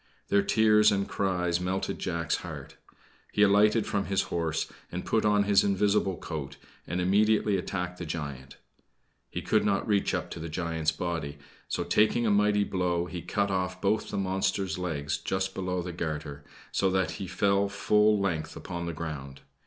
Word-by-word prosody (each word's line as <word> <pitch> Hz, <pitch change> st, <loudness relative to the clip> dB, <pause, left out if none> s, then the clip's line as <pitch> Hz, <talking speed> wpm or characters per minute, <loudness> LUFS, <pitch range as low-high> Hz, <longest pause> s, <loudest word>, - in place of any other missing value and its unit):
Their 100 Hz, -, +4 dB
tears 105 Hz, +1 st, +5 dB
and 100 Hz, -1 st, 0 dB
cries 90 Hz, -3 st, 0 dB
melted 95 Hz, +2 st, -2 dB
Jack's 85 Hz, -3 st, -1 dB
heart. -, -, -8 dB, 0.6 s
He 105 Hz, -, +3 dB
alighted 105 Hz, +2 st, +4 dB
from 100 Hz, -1 st, -1 dB
his 95 Hz, -1 st, +1 dB
horse, 80 Hz, -2 st, 0 dB, 0.3 s
and 90 Hz, +1 st, -4 dB
put 110 Hz, -1 st, +1 dB
on 105 Hz, -1 st, +4 dB
his 100 Hz, -1 st, +4 dB
invisible 100 Hz, -1 st, +1 dB
coat, 75 Hz, -5 st, -6 dB, 0.3 s
and 85 Hz, +3 st, -2 dB
immediately 105 Hz, +3 st, +3 dB
attacked 90 Hz, -1 st, -3 dB
the 90 Hz, -, -4 dB
giant. 70 Hz, -4 st, -6 dB, 0.7 s
He -, -, -5 dB
could -, -, +2 dB
not 100 Hz, -1 st, +1 dB
reach 100 Hz, -2 st, +2 dB
up -, -, -4 dB
to -, -, -6 dB
the 80 Hz, +1 st, -5 dB
giant's 80 Hz, -1 st, -1 dB
body; 80 Hz, -4 st, -4 dB, 0.3 s
so, -, -, -1 dB
taking 115 Hz, +2 st, +2 dB
a 110 Hz, -, +3 dB
mighty 105 Hz, 0 st, +3 dB
blow, 90 Hz, -3 st, 0 dB
he 90 Hz, -1 st, -6 dB
cut 100 Hz, +2 st, -1 dB
off 90 Hz, -1 st, -1 dB
both 105 Hz, +3 st, 0 dB
the 105 Hz, -, -3 dB
monster's 95 Hz, 0 st, -1 dB
legs 75 Hz, -4 st, -2 dB
just 95 Hz, 0 st, -2 dB
below 90 Hz, -1 st, -2 dB
the 90 Hz, 0 st, -5 dB
garter, 75 Hz, -3 st, -4 dB, 0.3 s
so 95 Hz, -, +2 dB
that 95 Hz, 0 st, +1 dB
he 95 Hz, -, -4 dB
fell 100 Hz, +2 st, +2 dB
full 105 Hz, +1 st, +3 dB
length 85 Hz, -6 st, -2 dB
upon 85 Hz, -1 st, -5 dB
the 85 Hz, -, -3 dB
ground. 75 Hz, -4 st, -6 dB
95 Hz, 175 wpm, -28 LUFS, 85-100 Hz, 0.7 s, tears